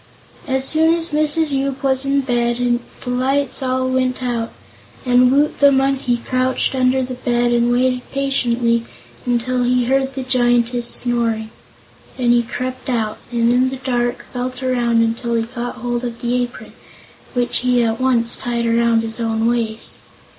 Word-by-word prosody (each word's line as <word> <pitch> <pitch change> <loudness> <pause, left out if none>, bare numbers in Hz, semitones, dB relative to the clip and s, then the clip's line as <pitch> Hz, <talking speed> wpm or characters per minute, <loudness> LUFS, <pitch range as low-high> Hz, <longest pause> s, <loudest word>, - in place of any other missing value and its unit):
As 265 -1 +3
soon 320 +1 +3
as 335 0 -2
Mrs. 305 +1 +2
Yoop 275 0 -2
was 265 0 +1
in 275 0 +2
bed 240 -2 0 0.4
the 250 - -6
lights 265 +2 0
all 255 0 0
went 255 0 -1
out, 235 -2 -2 0.5
and 250 0 +4
Woot 290 +2 +2
the 285 0 +6
Monkey 270 -2 +1
crouched 255 +2 0
under 260 0 +2
the 255 0 -5
bed 240 -1 0
and 240 0 +2
waited 250 +1 +1
patiently 240 -4 +1 0.4
until 245 +1 0
he 245 0 +2
heard 265 +1 0
the 265 - -3
Giantess 245 -1 +1
snoring. 230 -3 -1 0.7
Then 245 -2 +2
he 240 0 +4
crept 255 +3 -5
out 220 -4 -1
and 235 0 +2
in 255 +1 +3
the 265 - -5
dark 245 -2 -2
felt 250 +1 -4
around 240 -2 +2
until 235 +1 -1
he 230 - +1
got 240 +1 -5
hold 240 0 -3
of 235 -1 -5
the 240 0 -2
apron, 245 0 -6 0.6
which 245 0 +1
he 250 -1 +2
at 225 +2 -1
once 240 -2 +2
tied 235 -2 -2
around 230 0 +2
his 225 +1 -4
own 225 -1 -1
waist. 230 -2 -2
245 Hz, 165 wpm, -19 LUFS, 235-260 Hz, 0.7 s, the